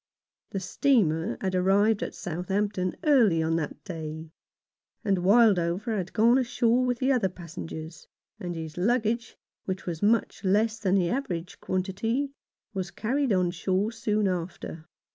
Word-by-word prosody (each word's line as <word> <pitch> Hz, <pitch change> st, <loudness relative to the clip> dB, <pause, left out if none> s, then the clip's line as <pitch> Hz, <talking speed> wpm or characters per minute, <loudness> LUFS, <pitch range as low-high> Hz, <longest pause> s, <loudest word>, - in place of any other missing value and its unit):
The 195 Hz, -, -3 dB
steamer 190 Hz, -, +1 dB
had 190 Hz, -1 st, -1 dB
arrived 195 Hz, +4 st, +3 dB
at -, -, -4 dB
Southampton 185 Hz, +2 st, -2 dB
early 230 Hz, -, +4 dB
on 160 Hz, +1 st, +1 dB
that 155 Hz, -, -4 dB
day, 160 Hz, -2 st, -6 dB, 0.7 s
and 195 Hz, -3 st, +2 dB
Wildover 200 Hz, 0 st, +3 dB
had 190 Hz, -2 st, -3 dB
gone 235 Hz, +3 st, +4 dB
ashore 240 Hz, -1 st, +2 dB
with 250 Hz, -1 st, 0 dB
the 260 Hz, +2 st, +1 dB
other 240 Hz, -8 st, +2 dB
passengers, 165 Hz, -2 st, -8 dB, 0.3 s
and 175 Hz, -1 st, -4 dB
his 160 Hz, -1 st, -6 dB
luggage, 235 Hz, +2 st, 0 dB, 0.3 s
which 190 Hz, 0 st, -4 dB
was 165 Hz, -3 st, -4 dB
much 215 Hz, 0 st, +1 dB
less 215 Hz, +3 st, +2 dB
than 195 Hz, -3 st, +1 dB
the 180 Hz, -3 st, +2 dB
average 180 Hz, -10 st, -3 dB
quantity, 225 Hz, +9 st, -1 dB, 0.4 s
was 190 Hz, -2 st, -3 dB
carried 260 Hz, +5 st, -1 dB
on 180 Hz, -3 st, +2 dB
shore 190 Hz, +4 st, 0 dB
soon 215 Hz, -2 st, 0 dB
after. 170 Hz, -2 st, -4 dB
195 Hz, 145 wpm, -27 LUFS, 175-225 Hz, 0.7 s, early